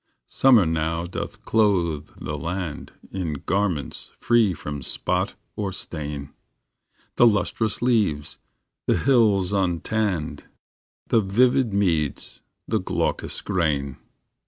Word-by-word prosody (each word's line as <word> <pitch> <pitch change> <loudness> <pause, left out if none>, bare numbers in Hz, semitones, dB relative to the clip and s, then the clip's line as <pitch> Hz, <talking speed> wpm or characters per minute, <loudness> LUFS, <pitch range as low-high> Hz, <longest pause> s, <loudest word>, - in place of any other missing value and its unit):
Summer 125 -8 +5
now 80 +1 -1
doth 85 - -6
clothe 90 -9 +2
the 75 - -4
land 85 +1 -4 0.2
In 90 -5 -3
garments 90 -2 -2
free 115 -4 +3
from 75 -3 -5
spot - - -1 0.2
or 100 -2 -2
stain 75 -5 -5 0.8
The 120 - +7
lustrous 105 +2 0
leaves, 105 -12 +1 0.5
the - - +3
hills 105 -8 +3
untanned, 95 -1 -1 0.6
The 115 - +4
vivid 120 +4 +3
meads, 85 -7 -1 0.3
the - - +1
glaucous - - -2
grain. 75 -7 -1
90 Hz, 105 wpm, -24 LUFS, 75-105 Hz, 0.8 s, The